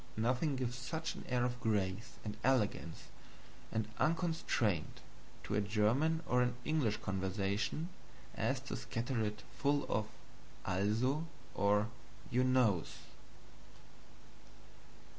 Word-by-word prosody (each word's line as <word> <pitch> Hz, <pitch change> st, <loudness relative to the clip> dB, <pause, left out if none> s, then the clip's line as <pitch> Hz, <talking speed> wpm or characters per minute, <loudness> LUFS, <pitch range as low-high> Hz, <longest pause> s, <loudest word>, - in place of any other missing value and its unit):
Nothing 125 Hz, +6 st, +2 dB
gives 125 Hz, -2 st, -1 dB
such 160 Hz, +6 st, -3 dB
an -, -, -9 dB
air 125 Hz, -1 st, +2 dB
of 125 Hz, 0 st, -2 dB
grace 105 Hz, 0 st, 0 dB
and 105 Hz, -, -3 dB
elegance 110 Hz, -10 st, +1 dB, 0.7 s
and 110 Hz, -1 st, 0 dB
unconstraint 155 Hz, -, +1 dB, 0.4 s
to -, -, -3 dB
a 105 Hz, -, +3 dB
German 115 Hz, +11 st, +2 dB
or 125 Hz, 0 st, +3 dB
an 125 Hz, 0 st, +2 dB
English 145 Hz, -9 st, +2 dB
conversation 95 Hz, -, -1 dB, 0.5 s
as -, -, 0 dB
to -, -, -4 dB
scatter 115 Hz, 0 st, -1 dB
it 105 Hz, 0 st, -3 dB, 0.2 s
full 145 Hz, 0 st, +3 dB
of 110 Hz, -1 st, 0 dB, 0.6 s
"Also's" 110 Hz, -, +2 dB, 0.3 s
or 105 Hz, +1 st, +3 dB, 0.4 s
"You 125 Hz, +1 st, +3 dB
knows." 125 Hz, -9 st, +3 dB
115 Hz, 110 wpm, -36 LUFS, 105-130 Hz, 0.7 s, a